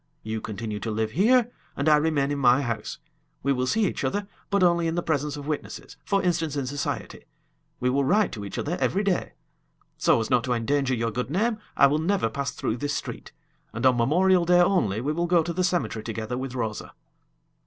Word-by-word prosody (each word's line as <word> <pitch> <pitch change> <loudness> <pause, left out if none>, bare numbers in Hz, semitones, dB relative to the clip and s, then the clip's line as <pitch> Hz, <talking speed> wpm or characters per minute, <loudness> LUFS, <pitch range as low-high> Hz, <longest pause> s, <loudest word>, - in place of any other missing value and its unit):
You 110 0 -4
continue 105 0 -5
to 110 - -4
live 110 0 -1
here, 235 - +3 0.3
and 140 - -1
I 155 - +7
remain 150 -2 +1
in 145 - -2
my 130 +1 +4
house. 110 -3 -4 0.5
We 140 +1 +2
will 130 -1 -1
see 220 +8 +2
each - - -2
other, 205 0 -1 0.2
but 200 -2 +2
only 170 -1 +3
in 165 - -1
the 175 - -1
presence 150 -2 -1
of 145 - -7
witnesses 150 -1 -5
for 200 -1 0
instance, 165 -4 0
in 140 -2 -1
society. 140 +2 -4 0.5
We 125 +1 +1
will 140 +2 +2
write 205 +10 +2
to 105 - -6
each 100 - -6
other 170 +4 -2
every 195 +3 +1
day. 195 -3 -1 0.7
So - - +4
as 110 - -3
not 120 -2 +3
to 125 - 0
endanger 135 +3 0
your 115 0 -1
good 125 +3 -3
name, 215 +7 0 0.2
I - - +7
will 145 +2 +3
never 170 - 0
pass 140 +3 -2
through 110 - -3
this 145 +3 -2
street, - - -6 0.4
and 115 +3 -3
on 130 -1 +5
Memorial 175 +9 +3
Day 175 +1 +4
only 175 - +2
we 145 +4 -1
will 170 +2 -1
go 170 -1 +3
to 170 - -3
the 185 +2 0
cemetery 175 -11 -1
together 110 +1 -4
with 130 0 -5
Rosa." 110 -4 -4
140 Hz, 215 wpm, -25 LUFS, 120-175 Hz, 0.7 s, I